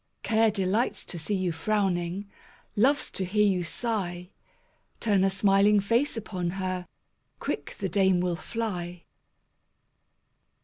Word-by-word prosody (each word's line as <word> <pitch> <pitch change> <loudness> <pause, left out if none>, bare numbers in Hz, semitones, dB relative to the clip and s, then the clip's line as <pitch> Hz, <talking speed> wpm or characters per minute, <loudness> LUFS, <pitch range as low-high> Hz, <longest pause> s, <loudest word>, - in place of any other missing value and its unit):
Care 225 0 +3
delights 205 +3 0
to 175 - -6
see 200 +6 -1
you 185 -2 0
frowning, 185 +1 -1 0.5
Loves 270 +7 +3
to 190 - -3
hear 210 +3 +2
you 185 -3 +2
sigh; 180 -2 -3 0.7
Turn 205 -4 +2
a 195 - +4
smiling 195 +2 +4
face 235 +7 +1
upon 185 -5 -3
her— 185 -1 -3 0.5
Quick - - -4
the 195 - -2
dame 190 0 +3
will 180 -1 0
fly. 180 -4 -4
195 Hz, 125 wpm, -27 LUFS, 180-210 Hz, 0.7 s, a